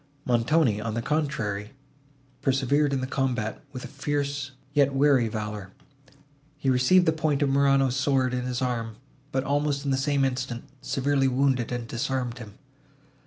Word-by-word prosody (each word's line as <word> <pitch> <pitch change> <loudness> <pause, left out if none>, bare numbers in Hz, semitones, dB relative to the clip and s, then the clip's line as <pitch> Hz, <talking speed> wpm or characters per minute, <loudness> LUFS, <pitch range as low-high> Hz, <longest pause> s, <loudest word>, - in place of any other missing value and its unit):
Montoni, 120 -1 +2
on 110 0 -3
the 115 - -1
contrary, 115 -9 -2 0.7
persevered 140 +2 +2
in 135 -2 0
the - - -1
combat, 125 -5 -2
with 130 -2 -7
a - - -6
fierce, 140 -1 -2 0.2
yet 140 -2 +3
wary, 135 -4 +4
valour; 105 -2 -5 0.9
he 135 -2 +1
received 130 +9 +4
the 160 - +4
point 155 -3 0
of 140 - +2
Morano's 135 -1 +3
sword 130 -2 +1
on 125 - 0
his 125 0 -2
arm, 115 -3 -2 0.4
but, 130 -1 0
almost 145 0 0
in 140 - +1
the 135 - +2
same 140 0 +1
instant, 125 -2 -3 0.2
severely 135 0 +1
wounded 130 -2 +1
and 120 -1 -3
disarmed 125 -1 -2
him. 105 -4 -10
135 Hz, 160 wpm, -26 LUFS, 120-140 Hz, 0.9 s, wary